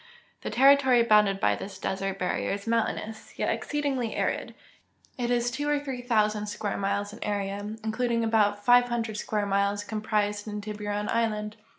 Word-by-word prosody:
The - - -4
territory 265 -2 +5
bounded 210 -3 +4
by - - +2
this 195 -1 -8
desert 195 0 -3
barrier 180 -1 -1
is 200 0 -5
mountainous, 225 -1 -2
yet - - +1
exceedingly 275 -6 -2
arid; - - -2 0.6
it 240 -1 -2
is 245 0 +1
two 290 +5 -2
or 295 -1 +2
three 270 -3 -5
thousand 215 -3 +1
square 210 -1 -3
miles 200 +1 -1
in - - -7
area, 205 +1 -3
including 230 +1 0
about 205 -2 +2
five 245 0 +6
hundred 225 -3 -2
sciuare 210 -1 -1
miles 200 +1 +1
comprised 210 0 -1
in 210 0 -4
Tiburon 210 0 -4
island. 215 -2 -1
215 Hz, 165 wpm, -27 LUFS, 205-235 Hz, 0.6 s, five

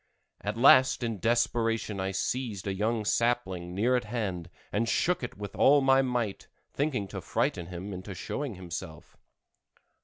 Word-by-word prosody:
At 105 +2 -3
last 130 0 +6
in 115 -4 -2
desperation 115 -2 0
I 95 0 -1
seized 105 +1 -2
a 100 - -1
young 110 +2 -1
sapling 95 -7 0
near 120 +6 +2
at 125 - 0
hand 100 -7 -3 0.2
and 115 +3 0
shook 180 0 +1
it 120 - -6
with 100 -1 -7
all 145 +2 +6
my 135 0 +5
might, 120 -6 -2 0.3
thinking 135 -8 -1
to - - -6
frighten 85 -2 -1
him 90 +3 -6
into 95 +1 -7
showing 115 - -4
himself. 85 -2 -8
105 Hz, 155 wpm, -29 LUFS, 95-120 Hz, 0.3 s, last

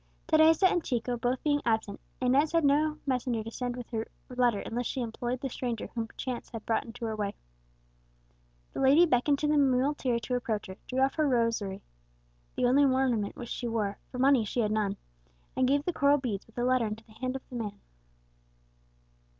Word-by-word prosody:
Teresa 320 +3 +5
and 350 -2 0
Chico 245 -1 -1
both 245 +2 -1
being 290 -1 +2
absent, 220 -3 0 0.2
Inez 270 +5 +2
had 330 -2 +3
no 300 +2 +3
messenger 250 -4 -1
to 225 - -7
send 245 +1 -3
with 245 -1 -7
her 225 -1 -2 0.2
letter, 245 -4 +2
unless 240 +1 -3
she - - -3
employed 240 +1 -3
the 270 - -2
stranger 240 -2 -4
whom 230 -1 -2
chance 255 -2 -4
had 225 -3 -8
brought 225 - 0
into 230 0 -7
her 220 -1 -2
way. 205 -2 -3 1.4
The - - -5
lady 280 +6 +6
beckoned 280 -1 +2
to 300 - -1
the 300 0 +3
muleteer 260 -2 +2
to 235 +2 -4
approach 225 -4 -2
her, 190 -1 -9
drew 255 +1 -1
off 270 +1 +3
her 310 -1 +3
rosary 230 -6 0 0.7
the - - +1
only 265 +4 +5
ornament 260 -6 +1
which 240 -1 -8
she 245 - -3
wore 210 -3 -2
for 250 - -6
money 265 -2 +4
she 225 +3 -1
had 210 -1 0
none, 210 -2 0 0.6
and 260 -1 +2
gave 285 +2 +2
the 355 - 0
coral 285 -1 +4
beads, 230 -8 -4
with 225 - -22
the 245 - -1
letter, 255 -2 +2
into 215 +1 -6
the 220 - -22
hand 255 +4 -4
of 265 - -7
the 255 - -8
man. 210 -4 -4
245 Hz, 200 wpm, -29 LUFS, 225-270 Hz, 1.4 s, lady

